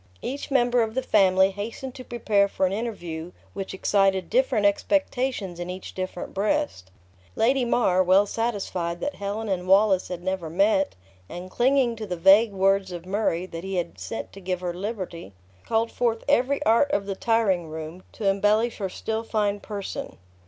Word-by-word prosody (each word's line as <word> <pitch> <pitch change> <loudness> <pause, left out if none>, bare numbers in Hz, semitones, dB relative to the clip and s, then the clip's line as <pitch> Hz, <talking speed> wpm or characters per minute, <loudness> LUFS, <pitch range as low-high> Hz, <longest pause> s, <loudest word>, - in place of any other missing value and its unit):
Each 275 +2 -4
member 245 -3 +3
of 220 0 -2
the 260 - 0
family 190 -3 +4
hastened 225 +6 -6
to 255 - -9
prepare 215 -5 +1
for 195 - 0
an 185 - 0
interview 180 -7 -5 0.2
which 195 -1 -5
excited 190 -2 +1
different 250 -4 +2
expectations 245 - 0
in 175 0 -5
each 185 +1 -7
different 185 -1 -5
breast. 210 - -1 0.5
Lady 255 +3 +2
Mar, 210 -6 +3
well 185 +2 +5
satisfied 195 -6 -2
that 290 - -2
Helen 205 +2 -3
and 185 -2 -2
Wallace 195 0 +4
had 175 -1 -6
never 185 -3 -2
met, 195 - +2 0.3
and 180 +1 -8
clinging 250 0 +2
to 215 -1 -6
the 180 -2 -3
vague 195 +6 +6
words 195 0 +2
of 175 -1 -7
Murray, 185 -3 0
that 165 -2 -8
he 190 0 -4
had 170 - -3
sent 95 +4 -6
to 195 - -10
give 180 -1 -3
her 175 -1 -2
liberty, 185 - -6 0.3
called 225 0 +1
forth 230 -2 0
every 280 +1 +2
art 230 +5 +4
of 200 -6 0
the 195 -1 -3
tiringroom 180 -7 -1
to 210 - -3
embellish 210 +4 +2
her 195 -2 -2
still 220 +4 -3
fine 210 -2 -1
person. 200 -1 -6
200 Hz, 175 wpm, -25 LUFS, 185-230 Hz, 0.5 s, vague